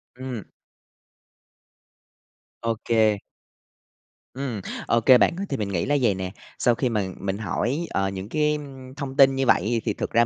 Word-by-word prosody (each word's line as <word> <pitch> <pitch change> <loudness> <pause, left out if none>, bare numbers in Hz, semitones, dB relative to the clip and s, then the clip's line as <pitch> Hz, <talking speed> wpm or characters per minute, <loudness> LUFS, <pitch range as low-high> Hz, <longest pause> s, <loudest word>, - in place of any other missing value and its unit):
Ừm. 125 -4 -6 2.2
Ô 115 0 0
kê. 110 -3 +3 1.2
Ừm, 130 -6 -4 0.3
ô 115 - +3
kê 125 +3 +7
bạn 170 - +3
ơi. 195 - -2
Thì 135 - -1
mình 105 -4 -2
nghĩ 90 -4 -1
là 145 +1 +2
vầy 115 -5 +3
nè, 95 0 -4 0.3
sau 120 - +3
khi 125 +1 0
mà 110 -3 0 0.2
mình 100 0 -2
hỏi, 115 - -1
ờ, 95 0 0
những 95 +1 -6
cái, 150 +2 +2
ưm, 135 -3 -9
thông 140 -2 -5
tin 135 -1 +7
như 135 0 +1
vậy 115 0 +2
thì - - +1
thực - - -4
ra 115 +1 +4
120 Hz, 175 wpm, -24 LUFS, 105-135 Hz, 2.2 s, kê